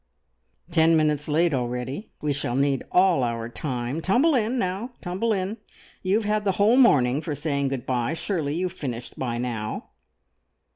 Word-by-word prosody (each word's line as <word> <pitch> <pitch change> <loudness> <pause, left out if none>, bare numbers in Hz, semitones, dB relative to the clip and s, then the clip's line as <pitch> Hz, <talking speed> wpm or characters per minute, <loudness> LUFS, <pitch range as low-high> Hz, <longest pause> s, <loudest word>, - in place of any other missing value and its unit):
"Ten 165 -1 +4
minutes 150 -1 +1
late 160 +2 +2
already. 125 - -3
We 150 -1 0
shall 130 -3 -2
need 140 -1 +1
all 180 -5 +4
our 115 -1 -2
time. 125 +3 -3
Tumble 250 - +3
in, 240 0 +1
now, 200 +5 -2
tumble 190 +6 -1
in! 200 +1 -1 0.4
You 190 +1 +1
have 220 0 0
had 210 0 +1
the 195 -2 +1
whole 205 +5 +4
morning 145 - +5
for 150 -2 -3
saying 140 -1 -1
good 135 -3 -3
bye. 125 +4 -1
Surely 160 -5 -2
you 180 +2 0
have 180 - -9
finished 125 -6 -6
by 120 -3 -2
now!" 115 -3 -4
155 Hz, 175 wpm, -25 LUFS, 130-190 Hz, 0.4 s, morning